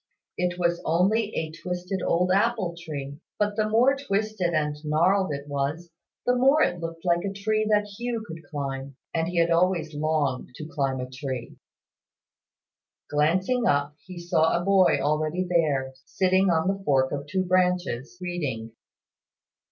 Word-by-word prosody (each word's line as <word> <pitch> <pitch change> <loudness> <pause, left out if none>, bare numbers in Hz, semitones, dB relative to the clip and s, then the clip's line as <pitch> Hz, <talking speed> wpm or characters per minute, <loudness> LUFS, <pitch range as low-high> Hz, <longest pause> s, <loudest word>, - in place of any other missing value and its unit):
It 180 0 -1
was 175 -1 0
only 195 +7 +2
a 160 -1 -2
twisted 180 +3 -4
old 180 +2 +1
apple 200 -3 +1
tree; 145 -4 -7 0.2
but 210 0 0
the 215 0 0
more 245 +5 +4
twisted 215 -8 -1
and 150 -2 0
gnarled 170 +4 +2
it 140 0 -5
was, 145 +4 -3 0.3
the 250 - +3
more 270 +5 +5
it 175 - 0
looked 165 +1 -6
like 175 -1 +2
a 200 - -2
tree 215 +2 0
that 210 -1 +3
Hugh 230 +2 -4
could 165 -4 -8
climb; 135 -2 -4 0.2
and 165 0 0
he 175 0 -3
had 170 0 +3
always 170 -2 +2
longed 145 -5 -1
to 155 - -7
climb 135 -4 -1
a 125 - -4
tree. 130 -2 -6 1.6
Glancing 185 +12 +2
up, 145 +1 +1
he 185 -1 -10
saw 170 -1 +2
a 175 - -5
boy 195 -5 +5
already 155 +5 0
there, 145 -7 +1
sitting 185 +2 +2
on 165 0 +2
the 195 0 -1
fork 135 -5 +2
of 145 +1 -4
two 185 +5 -1
branches, 180 -6 0
reading. 145 -11 -4
170 Hz, 160 wpm, -26 LUFS, 150-195 Hz, 1.6 s, more